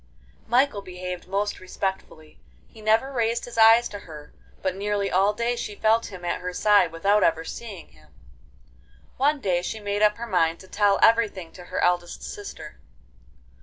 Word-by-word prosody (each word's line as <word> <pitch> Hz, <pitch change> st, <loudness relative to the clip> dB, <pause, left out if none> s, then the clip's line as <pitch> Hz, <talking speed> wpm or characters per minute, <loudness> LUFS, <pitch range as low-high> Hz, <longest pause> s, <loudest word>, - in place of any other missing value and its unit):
Michael 245 Hz, -2 st, +2 dB
behaved 180 Hz, -1 st, -7 dB
most 200 Hz, +2 st, -2 dB
respectfully. 185 Hz, -4 st, -6 dB, 0.3 s
He 220 Hz, -, -16 dB
never 220 Hz, +5 st, +2 dB
raised 235 Hz, -1 st, 0 dB
his 245 Hz, -, -10 dB
eyes 225 Hz, +1 st, +6 dB
to 205 Hz, -, -7 dB
her, 150 Hz, -5 st, -12 dB, 0.3 s
but 185 Hz, -1 st, -1 dB
nearly 200 Hz, 0 st, -1 dB
all 195 Hz, +3 st, +3 dB
day 235 Hz, +3 st, -1 dB
she 215 Hz, -3 st, -5 dB
felt 220 Hz, +2 st, +2 dB
him 185 Hz, -3 st, -9 dB
at -, -, -2 dB
her 180 Hz, 0 st, -4 dB
side 200 Hz, -3 st, +4 dB
without 200 Hz, +6 st, +2 dB
ever 160 Hz, 0 st, +1 dB
seeing 205 Hz, -6 st, -8 dB
him. 75 Hz, -3 st, -22 dB, 1.1 s
One 285 Hz, +3 st, +2 dB
day 180 Hz, -7 st, 0 dB
she 220 Hz, +4 st, -5 dB
made 205 Hz, 0 st, -3 dB
up 210 Hz, 0 st, +4 dB
her 235 Hz, -, -5 dB
mind 170 Hz, -6 st, +1 dB
to 190 Hz, -, -14 dB
tell 200 Hz, 0 st, +2 dB
everything 215 Hz, -7 st, +3 dB
to 180 Hz, -, -12 dB
her -, -, -4 dB
eldest 175 Hz, -1 st, 0 dB
sister. 160 Hz, -6 st, -9 dB
200 Hz, 170 wpm, -25 LUFS, 180-225 Hz, 1.1 s, eyes